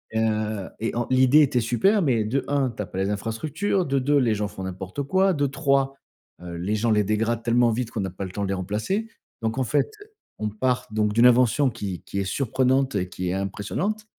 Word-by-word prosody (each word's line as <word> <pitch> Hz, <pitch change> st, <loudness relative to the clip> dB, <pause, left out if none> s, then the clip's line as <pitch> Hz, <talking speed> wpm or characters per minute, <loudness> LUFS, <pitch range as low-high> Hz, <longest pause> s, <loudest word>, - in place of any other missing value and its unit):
heu 110 Hz, -2 st, -1 dB
et 115 Hz, -, -2 dB
en 120 Hz, 0 st, -1 dB
l'idée 130 Hz, +3 st, +5 dB
était 135 Hz, -4 st, +2 dB
super 190 Hz, -, +2 dB
mais 120 Hz, -7 st, +2 dB
de 130 Hz, +6 st, -1 dB
1,, 140 Hz, -2 st, +1 dB
tu 115 Hz, -, -12 dB
as -, -, -7 dB
pas 95 Hz, -, -6 dB
les 95 Hz, -, 0 dB
infrastructures, 130 Hz, -, -1 dB
de 140 Hz, -, +1 dB
2,, 140 Hz, +2 st, +2 dB
les 115 Hz, -5 st, +2 dB
gens 105 Hz, 0 st, -1 dB
font 100 Hz, -2 st, -8 dB
n'importe 95 Hz, +6 st, -5 dB
quoi, 190 Hz, +7 st, +2 dB
de 145 Hz, -3 st, +1 dB
3, 135 Hz, 0 st, +1 dB, 0.5 s
heu, 85 Hz, -1 st, -6 dB
les 95 Hz, +5 st, -1 dB
gens 110 Hz, +2 st, +1 dB
les 105 Hz, -1 st, +3 dB
dégradent 110 Hz, +3 st, 0 dB
tellement 120 Hz, +1 st, +3 dB
vite 115 Hz, +1 st, -2 dB
qu'on 110 Hz, -, -3 dB
n'a 95 Hz, -1 st, -3 dB
pas 95 Hz, +2 st, -5 dB
le 95 Hz, -, -7 dB
temps 100 Hz, +2 st, -3 dB
de 95 Hz, -, -2 dB
les -, -, 0 dB
remplacer. 105 Hz, -, -2 dB, 0.3 s
Donc 115 Hz, +2 st, -2 dB
en 130 Hz, -, +1 dB
fait, 145 Hz, +4 st, +1 dB, 0.5 s
on 105 Hz, 0 st, -2 dB
part 125 Hz, +4 st, -1 dB
donc 105 Hz, -1 st, +1 dB
d'une 115 Hz, +3 st, +5 dB
invention 125 Hz, +2 st, +4 dB
qui 100 Hz, -6 st, -5 dB
qui 100 Hz, -, -4 dB
est -, -, 0 dB
surprenante 130 Hz, +5 st, +1 dB
et 90 Hz, -3 st, -1 dB
qui 90 Hz, 0 st, -4 dB
est -, -, -1 dB
impressionnante 105 Hz, -, -3 dB
115 Hz, 230 wpm, -24 LUFS, 105-135 Hz, 0.5 s, l'idée